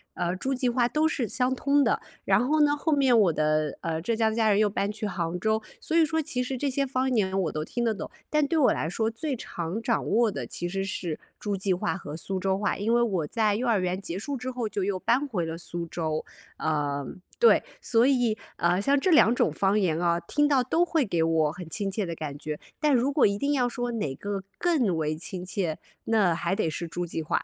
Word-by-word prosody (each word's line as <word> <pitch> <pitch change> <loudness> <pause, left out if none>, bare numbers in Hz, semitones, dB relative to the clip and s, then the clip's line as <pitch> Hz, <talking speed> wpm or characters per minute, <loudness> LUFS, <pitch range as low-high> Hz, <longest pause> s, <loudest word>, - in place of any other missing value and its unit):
呃， 175 0 -1
诸 265 +8 -2
暨 255 -1 0
话 240 0 +2
都 305 +5 +2
是 260 -7 -1
相 250 +4 0
通 280 +2 +2
的。 - - +1 0.2
然 245 - +3
后 305 +2 +3
呢， 290 0 +4
后 315 +2 -1
面 270 -5 +4
我 195 -7 +4
的， 155 -1 0
呃， 160 -1 -2
浙 230 +7 0
江 220 -1 +2
家 220 -1 +2
人 200 - +4
又 215 - +4
搬 200 0 -1
去 215 +1 -5
杭 175 -2 -3
州。 220 +3 +1 0.2
所 320 - -2
以 330 -1 +6
说 320 +1 0
其 285 -5 -2
实 260 +1 -3
这 280 +3 -1
些 275 +1 0
方 260 0 0
言 195 -5 +1
我 165 - -1
都 155 - -3
听 240 +7 -3
得 230 -2 +2
懂， 200 - -6 0.2
但 300 -1 +2
对 325 - 0
我 290 - +5
来 - - -2
说 220 +5 0
最 275 +5 -3
常 180 -2 -5
掌 230 0 0
握 225 0 +3
的， 135 -9 -4
其 175 - -4
实 195 +2 -2
是 175 -4 -4 0.2
诸 205 -1 -2
暨 190 0 0
话 180 - -1
和 150 -5 -7
苏 190 +4 -4
州 190 0 0
话。 205 +1 -1
因 220 +3 0
为 240 - +4
我 190 -10 0
在 215 +3 +1
幼 245 +4 -1
儿 225 -4 +3
园 185 +1 -1
结 175 -2 -4
束 275 +7 -4
之 255 +1 -5
后， 245 -3 -3
就 200 - -2
又 195 0 0
搬 255 +9 +1
回 190 -10 -2
了 160 0 -4
苏 170 0 -5
州。 160 -2 -3 0.3
呃， 145 -2 -1 0.3
对。 470 - +6 0.2
所 235 +1 +3
以， 245 -5 +2 0.2
啊， 175 +2 +2
像 275 +8 +3
这 370 - +1
两 245 -7 +6
种 165 - +2
方 195 +6 +1
言 170 -5 +1
啊， 170 -1 +2
听 295 - +1
到 275 -3 +3
都 330 +8 +2
会 320 -5 +1
给 175 -6 0
我 160 -2 +2
很 175 0 -9
亲 195 +4 -2
切 205 +1 -1
的 170 -1 -4
感 150 -3 -5
觉。 150 0 -5 0.2
但 300 -2 +3
如 255 +3 +2
果 280 -4 +4
一 200 0 -1
定 280 +7 0
要 250 -3 +2
说 245 0 -3
哪 155 -12 -2
个 200 +5 -4
更 280 - +2
为 155 -1 -1
亲 180 +2 -6
切， 180 -4 -2 0.3
那， 210 -6 +3
还 180 +3 -1
得 195 -6 0
是 170 +2 -4
诸 175 +2 -3
暨 165 -1 -4
话。 155 - -1
210 Hz, 265 characters per minute, -27 LUFS, 175-255 Hz, 0.3 s, 以